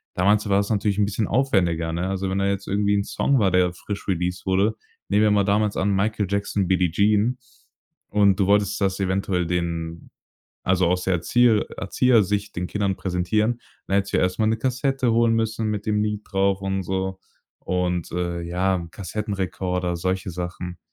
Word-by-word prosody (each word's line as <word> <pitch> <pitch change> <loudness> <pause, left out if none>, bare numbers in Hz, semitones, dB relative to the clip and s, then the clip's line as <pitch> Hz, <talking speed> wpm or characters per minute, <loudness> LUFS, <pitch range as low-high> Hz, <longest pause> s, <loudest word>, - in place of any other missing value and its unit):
Damals 105 +3 +2
war 100 0 +4
es 100 - -1
natürlich 105 -1 0
'n 105 - +3
bisschen 105 +1 -1
aufwendiger, 90 -10 +1
ne? 90 +2 -2
Also 95 0 -2
wenn 95 - 0
da 100 - +1
jetzt 100 0 -2
irgendwie 100 +1 +1
'n 100 - +1
Song 140 +5 +1
war, 100 -5 +3
der 90 -1 +2
frisch 100 +2 -7
released 90 0 -2
wurde, 100 +4 +2 0.3
nehmen 105 +1 +3
wir 105 - +4
mal 100 -1 +3
damals 105 +1 +1
an 100 +1 +1
Michael 105 +2 0
Jackson, 100 -1 -1
Billy 90 -1 +2
Jean 105 +6 +2 0.7
und 100 -1 +3
du 95 - +2
wolltest 105 0 +2
das 95 0 0
eventuell 95 -1 0
den 85 -1 -3 0.6
also 90 -1 +2
aus 90 +1 0
der 95 - +1
Erzieher 110 +6 +3
Erzieher-Sicht 105 -1 +1
den 90 0 -2
Kindern 100 -2 -1
präsentieren. 105 +6 0 0.3
Dann 95 - -1
hättest 100 0 0
du - - +4
ja - - +2
erst 90 0 -2
mal 110 - +3
'ne 110 +1 +1
Kassette 130 +1 0
holen 115 0 +3
müssen 110 -1 -1
mit 105 -1 -3
dem 105 -1 +1
Lied 105 -1 -2
drauf 95 0 +1
und 95 0 -1
so. 95 +1 -2 0.4
Und, 90 -2 -1
äh, 85 -1 -2
ja, 90 +3 0
'n 85 -2 -7
Kassettenrekorder, 90 -3 -3
solche 95 +2 -2
Sachen. 90 0 -6
95 Hz, 190 wpm, -23 LUFS, 90-105 Hz, 0.7 s, war